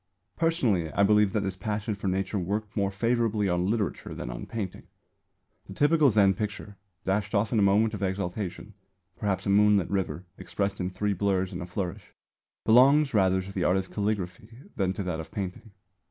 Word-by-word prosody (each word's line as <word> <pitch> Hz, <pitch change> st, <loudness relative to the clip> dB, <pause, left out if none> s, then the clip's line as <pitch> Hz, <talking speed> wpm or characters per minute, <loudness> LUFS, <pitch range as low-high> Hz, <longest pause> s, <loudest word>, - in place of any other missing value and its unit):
Personally 120 Hz, -, +1 dB
I 100 Hz, -, +3 dB
believe 105 Hz, 0 st, +4 dB
that 105 Hz, -, +1 dB
this 95 Hz, -1 st, -3 dB
passion 105 Hz, +2 st, -3 dB
for 100 Hz, -1 st, -5 dB
Nature 95 Hz, +2 st, -1 dB
worked 105 Hz, +4 st, -3 dB
more 100 Hz, -2 st, +1 dB
favourably 110 Hz, 0 st, 0 dB
on 90 Hz, +1 st, 0 dB
literature 105 Hz, -4 st, -2 dB
than -, -, -5 dB
on -, -, -7 dB
painting. 105 Hz, -5 st, -5 dB, 0.8 s
The -, -, -9 dB
typical 150 Hz, 0 st, +4 dB
Zen 100 Hz, -3 st, +4 dB
picture, 105 Hz, +1 st, -5 dB, 0.3 s
dashed 100 Hz, +3 st, -1 dB
off 100 Hz, +2 st, +1 dB
in 110 Hz, -, +3 dB
a -, -, +3 dB
moment 105 Hz, +3 st, +3 dB
of 105 Hz, -, -5 dB
exaltation 95 Hz, 0 st, -3 dB, 0.4 s
perhaps 95 Hz, -3 st, -2 dB
a 100 Hz, -, +1 dB
moonlit 105 Hz, -2 st, +4 dB
river 95 Hz, -2 st, -2 dB
expressed 100 Hz, 0 st, -3 dB
in 90 Hz, -1 st, -1 dB
three 105 Hz, +2 st, -1 dB
blurs 95 Hz, -1 st, 0 dB
and 90 Hz, -, -5 dB
a 90 Hz, -, -6 dB
flourish 95 Hz, +2 st, -5 dB, 0.5 s
belongs 135 Hz, +5 st, +5 dB
rather 95 Hz, -3 st, +3 dB
to 95 Hz, -, -9 dB
the 95 Hz, -, -1 dB
art 90 Hz, -, +3 dB
of 95 Hz, -1 st, -4 dB
calligraphy 100 Hz, -1 st, -3 dB, 0.3 s
than 95 Hz, -1 st, 0 dB
to 100 Hz, -, -4 dB
that 90 Hz, -3 st, -3 dB
of 80 Hz, -, -7 dB
painting. 100 Hz, +3 st, -5 dB
100 Hz, 185 wpm, -27 LUFS, 95-105 Hz, 0.8 s, belongs